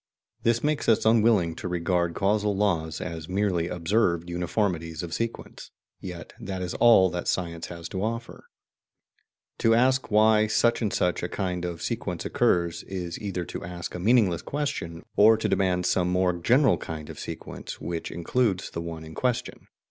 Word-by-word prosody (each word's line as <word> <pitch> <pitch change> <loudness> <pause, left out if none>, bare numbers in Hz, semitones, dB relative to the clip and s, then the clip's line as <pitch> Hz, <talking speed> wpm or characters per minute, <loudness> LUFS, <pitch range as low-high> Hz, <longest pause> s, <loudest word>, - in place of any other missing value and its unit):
This 115 0 +1
makes 150 -3 0
us 110 - +3
unwilling 110 -6 +4
to - - -5
regard 85 -1 0
causal 105 +1 +1
laws 85 -6 0
as 80 0 -6
MERELY 95 -3 0
observed 85 -1 0
uniformities 85 -2 -1
of 85 -1 -6
sequence; 115 +3 -5 0.3
yet 90 -3 -8
that 95 -1 -4
is 90 - -4
all 105 -6 +6
that 90 0 -4
science 85 -3 -2
has 85 -1 -7
to 95 +1 -3
offer. 115 +1 -4 1.1
To 115 0 +4
ask 130 +2 +2
why 110 0 +4
such 120 +3 +2
and 105 -3 0
such 90 -1 0
a 85 - -3
kind 90 -3 -2
of 85 -2 -5
sequence - - -3
occurs 85 -1 +1
is 90 -3 -5
either 95 -4 -3
to - - -7
ask 85 0 -6
a 90 - -5
meaningless 100 -3 +3
question, 140 - -4
or 110 +2 +7
to 110 - -1
demand 90 -2 +1
some 90 0 +2
more 90 0 +2
general 120 - +3
kind 80 -2 -6
of - - -11
sequence - - -7
which 85 -1 -4
includes 95 +3 0
the 85 - -4
one 85 -1 -6
in 80 - -10
question. 125 +4 -2
90 Hz, 170 wpm, -26 LUFS, 85-110 Hz, 1.1 s, or